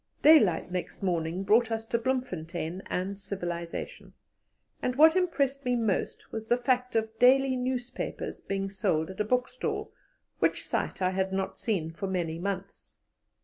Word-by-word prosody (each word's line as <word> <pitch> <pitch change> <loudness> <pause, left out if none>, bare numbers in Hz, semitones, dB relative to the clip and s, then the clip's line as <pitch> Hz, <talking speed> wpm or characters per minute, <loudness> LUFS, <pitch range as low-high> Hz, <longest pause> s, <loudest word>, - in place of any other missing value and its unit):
Daylight 215 - +6
next 180 +2 -4
morning 175 0 -1
brought 220 +4 +4
us 225 0 -2
to 235 +1 0
Bloemfontein 185 -9 -3
and 195 +2 -3
civilization, 175 -4 -5 0.7
and 250 - -1
what 320 +4 +7
impressed 280 -7 +1
me 250 -1 +1
most 225 -5 -1
was 220 0 -5
the 240 - +3
fact 250 0 0
of 220 0 -1
daily 265 +1 +5
newspapers 250 0 -3
being 195 0 -2
sold 185 -4 0
at 190 - -12
a - - +3
bookstall, 250 +3 -1 0.5
which - - +2
sight - - -2
I 185 - +3
had 190 0 -1
not 190 0 -2
seen 175 -8 -1
for 180 +4 -4
many 170 -3 -2
months. 195 +1 -5
205 Hz, 150 wpm, -29 LUFS, 185-250 Hz, 0.7 s, what